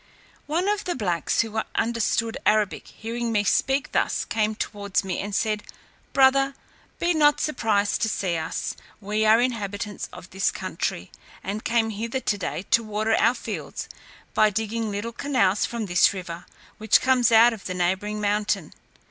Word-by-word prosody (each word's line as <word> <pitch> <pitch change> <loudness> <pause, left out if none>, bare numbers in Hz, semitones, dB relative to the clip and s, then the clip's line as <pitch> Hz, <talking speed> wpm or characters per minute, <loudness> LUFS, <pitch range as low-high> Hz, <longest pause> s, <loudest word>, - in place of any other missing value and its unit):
One 335 +6 0
of 415 0 0
the 355 - -1
blacks, 180 - 0
who 220 -1 -2
understood 230 0 0
Arabic, 210 -2 +1
hearing 230 +1 -4
me 210 -2 +2
speak 270 +7 +1
thus, - - 0
came 215 -1 0
towards 200 -3 -2
me, 190 -2 -3
and 205 0 -4
said, 215 -1 0 0.5
"Brother, 270 0 +4 0.4
be 345 0 +1
not 295 -2 +4
surprised 215 -8 0
to 220 - +2
see 185 -5 -1
us, 160 0 -3 0.2
we 210 +1 -1
are 220 +2 +6
inhabitants 210 -4 -2
of 180 - -12
this 190 +1 +1
country, - - -4 0.3
and 210 +3 -4
came 225 -1 +1
hither 230 +5 -3
to 210 -5 -1
day 180 -1 -3
to 230 - +5
water 215 +1 -1
our 245 - +3
fields, - - -6 0.5
by 215 - +5
digging 220 +1 -2
little 210 +3 -4
canals 230 -7 +1
from 235 -2 -4
this 175 -2 +4
river, 175 -2 -7 0.3
which 215 -1 +4
comes 255 -2 +3
out 230 +1 +7
of 215 - -10
the 185 - -3
neighbouring 190 +4 -1
mountain. 210 0 0
215 Hz, 165 wpm, -25 LUFS, 205-235 Hz, 0.5 s, out